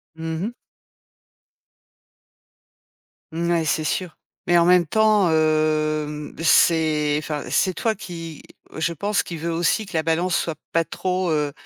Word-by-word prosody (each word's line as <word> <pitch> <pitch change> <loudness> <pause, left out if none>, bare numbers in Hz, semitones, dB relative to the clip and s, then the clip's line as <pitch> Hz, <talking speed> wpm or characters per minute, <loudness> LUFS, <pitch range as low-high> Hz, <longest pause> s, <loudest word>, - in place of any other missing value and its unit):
Mmh 160 0 -4
mh. 235 - -4 2.8
Ouais 170 0 0
c'est 155 +1 0
sûr, 175 +2 -2 0.3
mais 175 0 +4
en 170 - +4
même 180 -1 +5
temps, 210 -1 +3
hem, 155 -1 0
c'est 155 -3 +3
enfin, 150 -1 -4
c'est 185 - +1
toi 220 +4 -1
qui, 165 -4 -8 0.3
je 165 +1 -1
pense, 205 +6 -1
qui 170 - -7
veut 170 +2 -3
aussi 175 +5 0
que - - -12
la 160 - 0
balance 170 +2 0
soit 165 -2 -2 0.2
pas 165 -1 +1
trop, 185 -2 -2
heu, 150 -2 0
165 Hz, 140 wpm, -22 LUFS, 155-175 Hz, 2.8 s, même